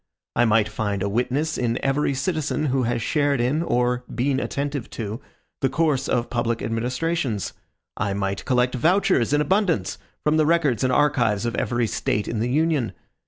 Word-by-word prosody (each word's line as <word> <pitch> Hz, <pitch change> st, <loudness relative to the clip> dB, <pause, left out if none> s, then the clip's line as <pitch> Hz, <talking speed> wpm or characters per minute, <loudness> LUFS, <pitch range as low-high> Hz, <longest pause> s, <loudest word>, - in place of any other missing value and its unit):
I 120 Hz, -, +4 dB
might 110 Hz, -1 st, +3 dB
find 105 Hz, -2 st, -2 dB
a -, -, 0 dB
witness 130 Hz, +8 st, 0 dB
in 120 Hz, -1 st, 0 dB
every 140 Hz, 0 st, +1 dB
citizen 155 Hz, +1 st, -1 dB
who 135 Hz, -, +2 dB
has 120 Hz, -2 st, -1 dB
shared 145 Hz, -2 st, +1 dB
in, 130 Hz, +6 st, +1 dB
or 125 Hz, -5 st, +1 dB
been 130 Hz, +2 st, 0 dB
attentive 140 Hz, -3 st, -3 dB
to, 110 Hz, +2 st, -5 dB, 0.4 s
the 135 Hz, -, +2 dB
course 150 Hz, -1 st, +1 dB
of 120 Hz, -1 st, 0 dB
public 120 Hz, -1 st, -1 dB
administrations. 125 Hz, -, -1 dB, 0.4 s
I 100 Hz, -2 st, -1 dB
might 100 Hz, 0 st, -2 dB
collect 125 Hz, 0 st, +2 dB
vouchers 140 Hz, -, +2 dB
in 145 Hz, 0 st, +3 dB
abundance 180 Hz, -, +1 dB, 0.2 s
from 150 Hz, +1 st, +2 dB
the 155 Hz, -1 st, +3 dB
records 155 Hz, -8 st, +2 dB
and 130 Hz, -, +2 dB
archives 120 Hz, -8 st, +2 dB
of 120 Hz, -, -1 dB
every 120 Hz, 0 st, 0 dB
State 105 Hz, -1 st, -1 dB
in 115 Hz, -, -2 dB
the 120 Hz, +3 st, 0 dB
Union. 150 Hz, -3 st, +1 dB
125 Hz, 170 wpm, -23 LUFS, 115-150 Hz, 0.4 s, I